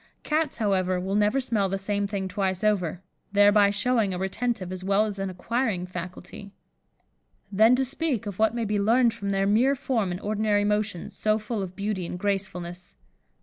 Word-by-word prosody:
Cats, 310 Hz, -1 st, 0 dB
however, 185 Hz, -4 st, +1 dB
will 190 Hz, +2 st, -3 dB
never 210 Hz, +5 st, +2 dB
smell 220 Hz, -7 st, 0 dB
the 195 Hz, -, -1 dB
same 200 Hz, +1 st, -1 dB
thing 195 Hz, -2 st, -3 dB
twice 190 Hz, 0 st, -2 dB
over, 190 Hz, -4 st, 0 dB, 0.3 s
thereby 205 Hz, 0 st, +6 dB
showing 210 Hz, -1 st, +1 dB
a -, -, -3 dB
retentive 190 Hz, 0 st, -2 dB
as 185 Hz, 0 st, -6 dB
well 200 Hz, +2 st, +2 dB
as 205 Hz, -2 st, -5 dB
an 195 Hz, 0 st, -2 dB
acquiring 200 Hz, 0 st, -1 dB
faculty. 180 Hz, +2 st, -8 dB, 1.0 s
Then 220 Hz, +5 st, +5 dB
to 265 Hz, +1 st, +1 dB
speak 270 Hz, -3 st, -2 dB
of 200 Hz, -2 st, -6 dB
what 220 Hz, +1 st, +3 dB
may 235 Hz, -1 st, -1 dB
be 210 Hz, 0 st, 0 dB
learned 230 Hz, +3 st, +3 dB
from 200 Hz, -3 st, -5 dB
their 195 Hz, 0 st, +1 dB
mere 235 Hz, +7 st, +3 dB
form 230 Hz, -7 st, -1 dB
and 175 Hz, 0 st, -4 dB
ordinary 210 Hz, 0 st, +1 dB
motions, 210 Hz, -3 st, -1 dB
so 215 Hz, 0 st, +1 dB
full 215 Hz, 0 st, -4 dB
of 185 Hz, -1 st, -6 dB
beauty 200 Hz, -3 st, -3 dB
and 180 Hz, -, -5 dB
gracefulness. 180 Hz, -3 st, -4 dB
205 Hz, 185 wpm, -26 LUFS, 190-220 Hz, 1.0 s, thereby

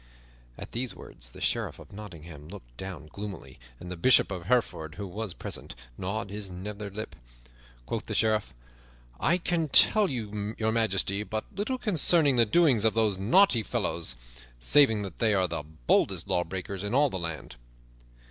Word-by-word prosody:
At -, -, -9 dB
these 125 Hz, +1 st, -3 dB
words -, -, -4 dB
the -, -, -13 dB
Sheriff -, -, -1 dB
of -, -, -14 dB
Nottingham 85 Hz, -7 st, -10 dB
looked 85 Hz, -11 st, -12 dB
down 95 Hz, -1 st, -7 dB
gloomily, 100 Hz, +1 st, -8 dB, 0.2 s
and 90 Hz, -, -8 dB
the -, -, -4 dB
Bishop 120 Hz, +4 st, +5 dB
of 90 Hz, -2 st, -5 dB
Hereford, 100 Hz, -10 st, 0 dB
who 100 Hz, -, -5 dB
was 100 Hz, 0 st, -5 dB
present, -, -, -5 dB, 0.2 s
gnawed 100 Hz, -, -4 dB
his 105 Hz, -1 st, -5 dB
nether 100 Hz, +3 st, -6 dB
lip. 110 Hz, +3 st, -7 dB, 0.7 s
Quoth -, -, -4 dB
the -, -, -3 dB
Sheriff, 110 Hz, -1 st, +1 dB, 0.7 s
"I 170 Hz, +6 st, +3 dB
can 175 Hz, -2 st, -1 dB
tell 210 Hz, +8 st, +6 dB
Your 110 Hz, -2 st, -3 dB
Majesty 105 Hz, -3 st, +1 dB
but 110 Hz, +1 st, -4 dB
little 215 Hz, +6 st, -2 dB
concerning 170 Hz, -, +3 dB
the 115 Hz, -2 st, +4 dB
doings 135 Hz, -4 st, +4 dB
of 110 Hz, -1 st, +2 dB
those 110 Hz, -4 st, +1 dB
naughty 120 Hz, -, +4 dB
fellows, 85 Hz, -, -1 dB, 0.4 s
saving 110 Hz, -, +5 dB
that 95 Hz, -4 st, -8 dB
they 110 Hz, -2 st, +3 dB
are 95 Hz, -1 st, +2 dB
the 80 Hz, -2 st, -3 dB
boldest 75 Hz, -5 st, 0 dB
lawbreakers 95 Hz, +2 st, -2 dB
in 105 Hz, +4 st, -2 dB
all 145 Hz, -1 st, +4 dB
the 95 Hz, -, -3 dB
land." 85 Hz, -2 st, -5 dB
105 Hz, 165 wpm, -28 LUFS, 90-115 Hz, 0.7 s, tell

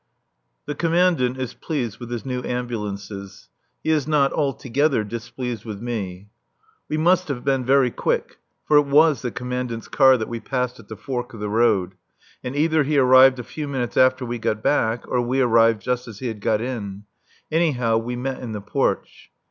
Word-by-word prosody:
The 145 Hz, -, -3 dB
Commandant 165 Hz, -5 st, +2 dB
is 130 Hz, -2 st, -4 dB
pleased 130 Hz, -10 st, -4 dB
with 120 Hz, -2 st, -8 dB
his 120 Hz, 0 st, -5 dB
new 125 Hz, -1 st, -3 dB
ambulances. 105 Hz, -5 st, -5 dB, 0.3 s
He 160 Hz, -, +1 dB
is 150 Hz, -3 st, +1 dB
not 145 Hz, -3 st, +2 dB
altogether 140 Hz, -2 st, 0 dB
displeased 120 Hz, +1 st, -5 dB
with 105 Hz, -3 st, -7 dB
me. 100 Hz, -5 st, -5 dB, 0.6 s
We 155 Hz, -, -1 dB
must 180 Hz, +3 st, +3 dB
have 135 Hz, -4 st, -4 dB
been 135 Hz, -2 st, +1 dB
very 130 Hz, -1 st, +3 dB
quick. -, -, -2 dB, 0.3 s
For 150 Hz, -, +5 dB
it 145 Hz, -1 st, +4 dB
was 145 Hz, -2 st, +4 dB
the 125 Hz, -, -2 dB
Commandant's 125 Hz, -1 st, -4 dB
car 130 Hz, -2 st, +5 dB
that 110 Hz, -, -3 dB
we 115 Hz, -1 st, -5 dB
passed 125 Hz, +1 st, -3 dB
at 110 Hz, -, -15 dB
the 110 Hz, -, -8 dB
fork 120 Hz, 0 st, -5 dB
of -, -, -10 dB
the 105 Hz, 0 st, -3 dB
road. 105 Hz, -4 st, +2 dB, 0.5 s
And 125 Hz, +2 st, -5 dB
either 155 Hz, +1 st, +2 dB
he 145 Hz, +1 st, +1 dB
arrived 130 Hz, 0 st, +7 dB
a 125 Hz, -, -5 dB
few 150 Hz, +5 st, -6 dB
minutes 130 Hz, -4 st, -3 dB
after 130 Hz, 0 st, +3 dB
we 120 Hz, 0 st, -4 dB
got 110 Hz, 0 st, -2 dB
back 115 Hz, -5 st, +1 dB
or 125 Hz, -, +1 dB
we 125 Hz, +2 st, -1 dB
arrived 115 Hz, -4 st, +4 dB
just 125 Hz, +2 st, -2 dB
as 110 Hz, -3 st, -9 dB
he 125 Hz, +2 st, -4 dB
had 110 Hz, -2 st, -7 dB
got 110 Hz, 0 st, +1 dB
in. 105 Hz, -5 st, -5 dB, 0.5 s
Anyhow, 130 Hz, -9 st, +2 dB
we 120 Hz, +2 st, -4 dB
met 130 Hz, +2 st, -3 dB
in 120 Hz, -3 st, -6 dB
the 105 Hz, -, -4 dB
porch. 100 Hz, -, -2 dB
125 Hz, 190 wpm, -22 LUFS, 115-135 Hz, 0.6 s, arrived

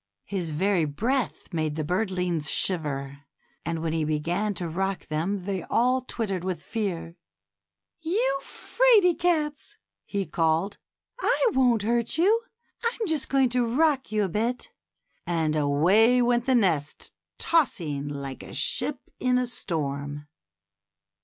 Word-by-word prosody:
His 185 Hz, -5 st, -3 dB
very 175 Hz, +2 st, +1 dB
breath 230 Hz, -, -2 dB
made 155 Hz, -2 st, -1 dB
the 155 Hz, -, -2 dB
birdlings 180 Hz, -3 st, -1 dB
shiver, 140 Hz, -6 st, -1 dB, 0.4 s
and 165 Hz, -1 st, -3 dB
when 160 Hz, -1 st, -1 dB
he 160 Hz, -1 st, 0 dB
began 170 Hz, +7 st, -1 dB
to 175 Hz, -, -3 dB
rock 190 Hz, +3 st, -2 dB
them 160 Hz, +6 st, -1 dB
they 190 Hz, 0 st, -3 dB
all 255 Hz, +2 st, +2 dB
twittered 205 Hz, -7 st, -3 dB
with 180 Hz, -3 st, -3 dB
fear. 180 Hz, -6 st, -4 dB, 0.8 s
You 415 Hz, +10 st, 0 dB
little -, -, -15 dB
'fraid 435 Hz, -9 st, +3 dB
cats," 305 Hz, -4 st, 0 dB, 0.3 s
he 200 Hz, -1 st, -2 dB
cried. 165 Hz, +5 st, 0 dB, 0.4 s
I -, -, +2 dB
won't 245 Hz, -, +3 dB
hurt 235 Hz, +4 st, 0 dB
you; 415 Hz, +7 st, +4 dB, 0.4 s
I'm 465 Hz, -1 st, -1 dB
just 315 Hz, -7 st, 0 dB
going 270 Hz, -2 st, +3 dB
to 245 Hz, 0 st, +2 dB
rock 270 Hz, +3 st, +1 dB
you 215 Hz, -1 st, +1 dB
a -, -, +1 dB
bit;" 240 Hz, -, -2 dB, 0.6 s
and 160 Hz, -3 st, 0 dB
away 175 Hz, +12 st, +4 dB
went 240 Hz, 0 st, +2 dB
the 260 Hz, -, +4 dB
nest, 165 Hz, -10 st, 0 dB, 0.3 s
tossing 165 Hz, -, +1 dB
like 140 Hz, -2 st, -6 dB
a -, -, -9 dB
ship 285 Hz, -4 st, 0 dB, 0.2 s
in 250 Hz, 0 st, +2 dB
a 250 Hz, -, +1 dB
storm. 145 Hz, -, -3 dB
195 Hz, 140 wpm, -26 LUFS, 160-250 Hz, 0.8 s, you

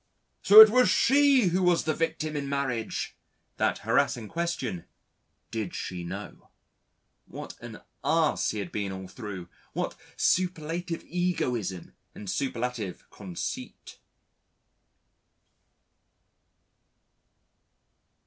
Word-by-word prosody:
So 210 Hz, +2 st, +11 dB
it 220 Hz, -1 st, +10 dB
was 250 Hz, +1 st, +5 dB
she 275 Hz, -5 st, +4 dB
who 180 Hz, +2 st, +1 dB
was 180 Hz, -2 st, +3 dB
the 155 Hz, -, 0 dB
victim 155 Hz, -1 st, -2 dB
in 140 Hz, -1 st, -3 dB
marriage! 135 Hz, -5 st, -2 dB, 0.4 s
That -, -, +1 dB
harassing 115 Hz, -3 st, +1 dB
question: 165 Hz, -, -3 dB, 0.7 s
Did 110 Hz, -5 st, -4 dB
she 90 Hz, -1 st, -5 dB
know? 85 Hz, -, -8 dB, 0.8 s
What -, -, -8 dB
an -, -, -10 dB, 0.2 s
ass -, -, +2 dB
he -, -, -3 dB
had 100 Hz, -4 st, -4 dB
been 100 Hz, -2 st, -3 dB
all 95 Hz, 0 st, -7 dB
through, 95 Hz, -3 st, -8 dB, 0.3 s
what -, -, -2 dB, 0.2 s
superlative 175 Hz, -1 st, 0 dB
egoism 125 Hz, -, -2 dB, 0.2 s
and 105 Hz, -, -9 dB
superlative 120 Hz, -4 st, -3 dB
conceit! 95 Hz, -4 st, -7 dB
135 Hz, 100 wpm, -28 LUFS, -, 0.8 s, So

